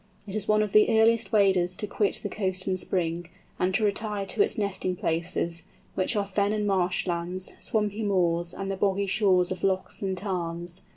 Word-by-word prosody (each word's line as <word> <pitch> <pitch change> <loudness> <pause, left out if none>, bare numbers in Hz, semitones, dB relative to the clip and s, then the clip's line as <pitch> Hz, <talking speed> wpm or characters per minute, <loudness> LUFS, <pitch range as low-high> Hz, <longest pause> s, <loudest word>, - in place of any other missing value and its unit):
It 195 - -8
is 210 -1 -2
one 215 0 +4
of 210 - -3
the 215 +1 +5
earliest 230 +1 +3
waders 190 -4 +3
to - - -4
quit 205 0 -1
the - - -1
coast 190 -2 -2
in 190 - +1
spring, 175 -2 -2 0.3
and 185 - +2
to 220 - +1
retire 210 -1 -1
to 300 - 0
its 415 - +2
nesting 190 -3 -1
places, 170 0 -2 0.3
which 185 +4 0
are 205 -1 +1
fen 200 +1 0
and 210 -1 -1
marsh 185 -3 +1
lands, 180 +1 -2
swampy 210 -1 -1
moors, 175 -4 +1
and 195 +1 -4
the 195 - -3
boggy 200 0 +1
shores 185 -3 +2
of 185 -1 -5
lochs 190 -1 -1
and 190 -2 -2
tarns. 175 -2 -3
195 Hz, 195 wpm, -27 LUFS, 180-210 Hz, 0.3 s, the